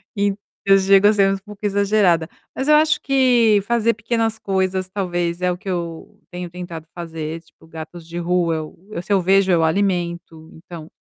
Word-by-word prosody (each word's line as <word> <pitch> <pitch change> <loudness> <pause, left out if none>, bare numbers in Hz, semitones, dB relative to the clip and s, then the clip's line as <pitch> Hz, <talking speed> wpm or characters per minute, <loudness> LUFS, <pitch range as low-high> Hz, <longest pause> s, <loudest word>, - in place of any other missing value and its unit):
Então 200 0 0 0.3
eu 195 0 +6
chego 195 +1 +5
a 215 - +5
ser 195 -1 +3
um - - -2
pouco 210 +1 -10
exagerada, 200 -5 +2 0.3
mas 265 - -3
eu 300 - +7
acho 310 0 +3
que 245 -6 +3
fazer 230 0 +2
pequenas 225 0 -1
coisas, 190 -2 -1
talvez, 175 -3 -2
é 180 0 +1
o 175 - -4
que 200 +1 -15
eu 170 -2 -5
tenho 180 -1 -6
tentado 170 -2 -8
fazer, 165 -1 -6
tipo, 160 0 -23
gatos 160 +1 -10
de 170 +1 -7
rua, 170 -1 0 0.4
eu 170 - -4
se 190 - -9
eu 195 - +4
vejo 190 +1 +3
eu 165 -2 +3
alimento, 170 -2 -2
então 165 -1 -10
eh, - - -16
185 Hz, 190 wpm, -20 LUFS, 170-205 Hz, 0.4 s, eu